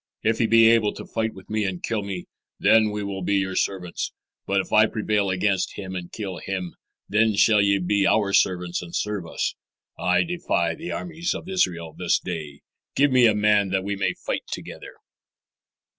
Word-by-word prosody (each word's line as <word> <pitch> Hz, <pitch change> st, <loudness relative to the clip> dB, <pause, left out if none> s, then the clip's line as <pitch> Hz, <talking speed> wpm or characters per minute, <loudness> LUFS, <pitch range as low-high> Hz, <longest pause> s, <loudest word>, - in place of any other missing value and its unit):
If 115 Hz, 0 st, +1 dB
he 115 Hz, -, +3 dB
be 115 Hz, 0 st, +6 dB
able 115 Hz, -2 st, +3 dB
to -, -, -8 dB
fight 110 Hz, -1 st, -2 dB
with 95 Hz, -1 st, -13 dB
me 110 Hz, 0 st, -1 dB
and 95 Hz, -3 st, -2 dB
to -, -, -2 dB
kill 110 Hz, -2 st, -1 dB
me, 100 Hz, -3 st, -5 dB, 0.3 s
then 110 Hz, -1 st, +5 dB
will 100 Hz, -2 st, -4 dB
we -, -, -6 dB
be 100 Hz, +3 st, +1 dB
your 95 Hz, -1 st, 0 dB
servants; 90 Hz, -3 st, -2 dB, 0.4 s
but 100 Hz, 0 st, +2 dB
if -, -, -4 dB
I 110 Hz, +1 st, +6 dB
prevail 105 Hz, -2 st, 0 dB
against 95 Hz, +1 st, 0 dB
him 95 Hz, -2 st, -6 dB
and 90 Hz, -1 st, -6 dB
kill 95 Hz, -5 st, -5 dB
him, 95 Hz, -2 st, -4 dB, 0.3 s
then 110 Hz, 0 st, +2 dB
shall 105 Hz, 0 st, +5 dB
ye 100 Hz, 0 st, +3 dB
be 100 Hz, +2 st, +1 dB
our 100 Hz, -2 st, +2 dB
servants 90 Hz, -2 st, +1 dB
and 85 Hz, -1 st, -8 dB
serve 105 Hz, -5 st, -2 dB
us. -, -, -2 dB, 0.5 s
I 90 Hz, 0 st, +2 dB
defy 170 Hz, -, -1 dB
the 165 Hz, +2 st, -7 dB
armies 170 Hz, 0 st, -3 dB
of -, -, -7 dB
Israel 85 Hz, -, -1 dB
this -, -, +1 dB
day. 75 Hz, -5 st, -6 dB, 0.3 s
Give 145 Hz, 0 st, +3 dB
me 125 Hz, -2 st, +6 dB
a 110 Hz, -, +3 dB
man 105 Hz, -1 st, +3 dB
that 95 Hz, 0 st, 0 dB
we 100 Hz, +1 st, -2 dB
may 100 Hz, -, -1 dB
fight -, -, -4 dB
together." -, -, -8 dB
100 Hz, 200 wpm, -24 LUFS, 95-110 Hz, 0.5 s, be